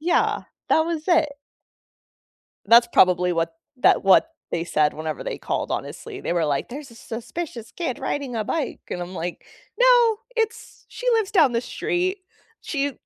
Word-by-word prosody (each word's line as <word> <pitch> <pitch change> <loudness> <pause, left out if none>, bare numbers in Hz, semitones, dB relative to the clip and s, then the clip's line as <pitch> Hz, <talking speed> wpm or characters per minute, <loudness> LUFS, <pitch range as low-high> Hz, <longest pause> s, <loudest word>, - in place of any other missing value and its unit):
yeah, 340 +3 +1 0.3
that - - +4
was 325 -2 -3
it. 315 -5 +3 1.3
That's 235 +2 +7
probably 180 -4 +4
what 165 -1 -1 0.2
that - - +4
what 195 - +5 0.2
they 165 - -1
said 150 -3 +1
whenever 155 -1 -5
they - - -4
called, - - -3
honestly, - - -5
they - - -2
were 170 -2 +1
like, 145 -2 -1
"There's 275 +2 -8
a - - -14
suspicious 235 +2 -7
kid 325 -9 -3
riding 270 -2 -3
a 215 - -1
bike," 285 +5 -2
and 180 - -3
I'm 175 +2 -7
like, 175 0 -5 0.4
"No, 485 -3 +5 0.2
it's 450 -1 -3
she - - -8
lives 440 -4 +1
down 320 - +4
the 235 - +1
street, 365 +8 -1 0.4
she 285 -2 -2
255 Hz, 165 wpm, -23 LUFS, -, 1.3 s, That's